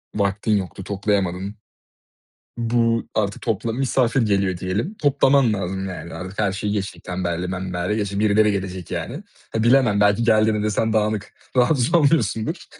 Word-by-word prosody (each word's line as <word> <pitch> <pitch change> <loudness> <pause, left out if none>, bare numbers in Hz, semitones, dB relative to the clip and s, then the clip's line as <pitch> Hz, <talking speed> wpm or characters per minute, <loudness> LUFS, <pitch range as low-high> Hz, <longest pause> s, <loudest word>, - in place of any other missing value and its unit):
vaktin 100 +1 +1
yoktu, 95 0 -5
toplayamadın. 100 -1 -1 1.0
Bu 115 -1 +1
artık 105 -2 -1
topla 115 0 -1
misafir 130 0 +1
geliyor 100 -4 +1
diyelim. 100 - -2
Toplaman 140 - +3
lazım, 95 -1 -3
yani, 85 -2 -7
artık 95 +1 -8
her 100 -3 +1
şeyi 105 +1 -2
geçtik, 100 -2 -4
tembelliği 90 -1 -3
membelliği 90 +2 -2
geçtik. 100 -1 -2
Birileri 105 0 +4
gelecek, 95 -3 -4
yani. - - -4 0.3
Ha, 110 - 0
bilemem, 120 -4 +4
belki 105 +3 +3
geldiğinde 110 -1 +3
de 105 - 0
sen 110 +1 0
dağınık 110 -1 -1 0.2
rahatsız 125 +1 +3
olmuyorsundur. 145 - +2
105 Hz, 145 wpm, -22 LUFS, 95-115 Hz, 1.0 s, Birileri